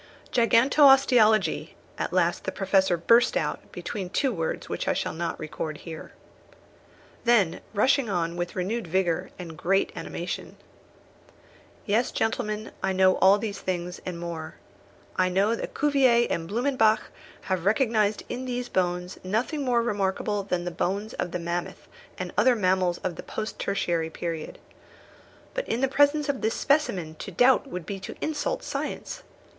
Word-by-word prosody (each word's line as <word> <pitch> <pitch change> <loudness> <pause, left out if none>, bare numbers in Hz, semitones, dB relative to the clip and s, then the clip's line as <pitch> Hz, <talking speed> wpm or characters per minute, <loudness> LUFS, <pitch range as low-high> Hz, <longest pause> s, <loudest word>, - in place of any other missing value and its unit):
"Gigantosteologie," 245 -2 +4 0.2
at - - -2
last - - +1
the - - -1
Professor 190 -2 +2
burst 230 +8 +4
out, - - -3
between 190 -3 -5
two 265 +6 0
words 165 -4 -3
which - - -4
I - - +3
shall - - -2
not 165 0 -3
record 155 0 -5
here. 160 0 -9 1.1
Then 225 -8 +3
rushing 255 +3 +3
on 170 -3 -1
with 175 0 -4
renewed 195 +3 -2
vigour, 175 -1 0
and 175 -3 -7
with 160 - -13
great 195 +3 +2
animation: - - -5 1.3
"Yes, 220 +3 +1
gentlemen, 215 -1 -2
I 190 0 0
know 185 0 +4
all 195 +2 +6
these 205 -1 -4
things, 180 -1 -4
and 180 -2 -5
more. 165 -2 -6 0.6
I 185 0 +3
know 195 +5 +2
that 230 - -5
Cuvier 265 -5 +4
and 165 0 -2
Blumenbach 225 -2 +2 0.3
have 185 -2 -2
recognised 215 -1 +2
in 250 +1 -5
these 245 -1 -3
bones 180 0 -1
nothing 225 +11 -1
more 240 -3 +2
remarkable 205 -1 -1
than 180 -3 -2
the 175 - -2
bones 200 +5 -2
of 180 - -3
the 180 - -3
mammoth 170 0 -4 0.3
and 185 -1 -5
other 245 +4 +4
mammals 185 -3 +1
of 180 -2 -3
the - - -5
post 215 0 -5
tertiary 170 -5 -1
period. 165 -1 -5 1.0
But - - -3
in 230 - -1
the 270 - +3
presence 290 +2 +3
of 280 -3 -1
this 220 +1 0
specimen 185 - 0
to - - -6
doubt 250 +9 +4
would 180 -10 -6
be 195 +2 -5
to - - -8
insult - - -2
science. - - -4
200 Hz, 155 wpm, -26 LUFS, 180-240 Hz, 1.3 s, all